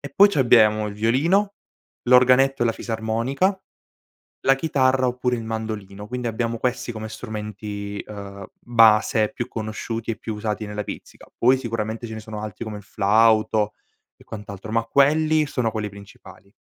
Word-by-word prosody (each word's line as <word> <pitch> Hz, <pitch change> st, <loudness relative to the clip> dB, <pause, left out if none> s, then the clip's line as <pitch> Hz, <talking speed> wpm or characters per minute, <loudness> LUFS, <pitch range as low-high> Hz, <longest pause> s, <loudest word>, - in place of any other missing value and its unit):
E 140 Hz, -, -8 dB
poi 200 Hz, +1 st, +7 dB
c'abbiamo 110 Hz, -5 st, +4 dB
il 100 Hz, -, -6 dB
violino, 165 Hz, -, +1 dB, 0.5 s
l'organetto 130 Hz, +1 st, +5 dB
e -, -, +3 dB
la 115 Hz, -, +1 dB
fisarmonica, 115 Hz, -, -1 dB, 0.8 s
la 135 Hz, -, +5 dB
chitarra 130 Hz, -3 st, +1 dB
oppure 125 Hz, 0 st, -1 dB
il 115 Hz, -, -6 dB
mandolino. 110 Hz, -3 st, -5 dB
Quindi 125 Hz, +1 st, -4 dB
abbiamo 115 Hz, 0 st, -2 dB
questi 125 Hz, 0 st, -2 dB
come 110 Hz, 0 st, -6 dB
strumenti, 105 Hz, -2 st, -6 dB
ehm, 100 Hz, -2 st, -9 dB
base 110 Hz, -1 st, +4 dB
più 120 Hz, -3 st, -4 dB
conosciuti 115 Hz, +1 st, -5 dB
e -, -, -6 dB
più 110 Hz, -, -6 dB
usati 105 Hz, 0 st, -3 dB
nella 105 Hz, 0 st, -5 dB
pizzica, -, -, -10 dB
poi 130 Hz, +3 st, +4 dB
sicuramente 115 Hz, -2 st, -4 dB
ce 110 Hz, -, -7 dB
ne 110 Hz, -, -6 dB
sono 110 Hz, -1 st, -7 dB
altri 110 Hz, +2 st, -6 dB
come 110 Hz, -2 st, -6 dB
il -, -, -12 dB
flauto 110 Hz, +1 st, +2 dB, 0.5 s
e -, -, -17 dB
quant'altro, 105 Hz, -1 st, -8 dB
ma 115 Hz, 0 st, +2 dB
quelli 155 Hz, +5 st, +3 dB
sono 125 Hz, -5 st, -1 dB
quelli 105 Hz, -1 st, -3 dB
principali. 100 Hz, -1 st, -15 dB
115 Hz, 160 wpm, -23 LUFS, 105-125 Hz, 0.8 s, poi